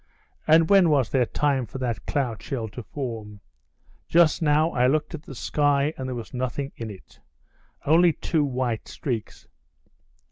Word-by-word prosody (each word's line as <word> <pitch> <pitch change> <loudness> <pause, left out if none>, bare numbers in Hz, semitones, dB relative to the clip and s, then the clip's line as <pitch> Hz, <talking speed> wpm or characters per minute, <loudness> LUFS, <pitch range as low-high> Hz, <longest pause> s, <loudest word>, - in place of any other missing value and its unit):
And 160 +1 +6
when 195 -3 +5
was 140 -6 +2
there 125 -3 +2
time 140 -3 0
for 120 - -8
that 125 -3 -3
cloud 125 -6 -1
shell 120 -5 -4
to 115 +4 -8
form? 110 -5 -6 0.7
Just 170 0 +4
now 155 +1 +3
I 125 +1 +2
looked 150 +4 0
at 160 - -6
the 135 - -11
sky, 145 +3 +1
and 130 - -5
there 130 - -4
was 115 +2 -8
nothing 130 +2 -3
in 115 -1 -6
it—only 140 - -2
two 155 0 0
white 125 -4 -2
streaks. 120 -6 -5
135 Hz, 155 wpm, -25 LUFS, 120-150 Hz, 0.7 s, And